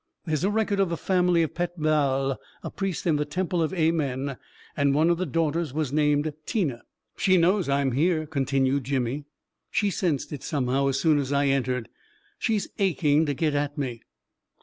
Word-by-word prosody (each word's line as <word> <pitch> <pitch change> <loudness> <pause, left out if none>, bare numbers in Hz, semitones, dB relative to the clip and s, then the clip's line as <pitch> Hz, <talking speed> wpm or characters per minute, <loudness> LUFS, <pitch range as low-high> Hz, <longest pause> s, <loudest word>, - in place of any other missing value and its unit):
There 160 - -2
is 155 - 0
a 195 - +3
record 210 -1 0
of 195 -3 +2
the 170 - -2
family 180 0 +2
of 160 - -3
Pet 175 0 -3
Baal, 135 -3 +1 0.2
a - - -5
priest 195 -4 -3
in 160 -4 +3
the 150 - +1
temple 175 +3 -1
of 160 - 0
Amen, 145 -6 0 0.4
and 140 -1 +2
one 160 +3 +4
of 170 - 0
the 185 - -1
daughters 160 0 -1
was 150 -4 -1
named 150 0 +2
Tina." 150 - -1 0.2
" - - -55
She 185 -1 +4
knows 180 0 +2
I 140 +1 +2
am 135 -1 +1
here," 155 +4 +1
continued 135 -2 0
Jimmy; 135 +1 -1 0.2
" - - -58
she 205 -2 +1
sensed 165 -6 -1
it, 140 - -6
somehow, 135 -1 0
as 135 0 0
soon 155 -2 +3
as 140 -1 -2
I 140 0 +2
entered. 125 -3 0 0.5
She's 215 -3 0
aching 160 -5 +2
to 145 - -1
get 155 +1 0
at 145 0 -1
me 125 -5 -3
150 Hz, 200 wpm, -26 LUFS, 140-170 Hz, 0.5 s, one